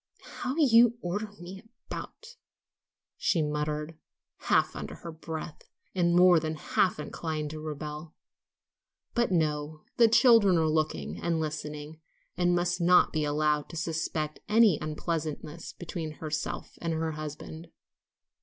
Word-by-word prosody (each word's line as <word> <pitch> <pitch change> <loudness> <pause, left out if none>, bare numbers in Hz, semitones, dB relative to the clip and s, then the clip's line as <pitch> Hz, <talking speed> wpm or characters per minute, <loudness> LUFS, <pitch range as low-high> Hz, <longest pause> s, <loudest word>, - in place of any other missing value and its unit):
"How 255 - -5
you 240 -6 +6
do - - -27
order 205 +4 -3
me 185 +2 -9 0.2
about," 470 +1 -8 0.8
she 165 -4 +1
muttered, 150 +1 -3 0.4
half - - +2
under - - -6
her 170 - -8
breath, 160 -1 -7 0.2
and 175 -2 +2
more 180 -1 +7
than 155 0 -3
half 180 +4 +1
inclined 150 0 -4
to 155 - -6
rebel. 150 +1 -6 1.0
But 240 -4 +1
no; 155 -2 -1
the 235 - +7
children 225 -5 +6
were 160 -1 +2
looking 120 - -1
and 170 -1 0
listening, 150 0 -5 0.4
and 175 0 +2
must 175 0 0
not 180 +1 +5
be 155 -1 0
allowed 150 0 +1
to - - -9
suspect 160 -1 -2
any 215 -6 +5
unpleasantness 155 0 -4
between 165 -2 -6
herself 155 0 -5
and 170 -1 -1
her 160 0 -1
husband. 155 +2 -7
160 Hz, 135 wpm, -29 LUFS, 150-175 Hz, 1.0 s, more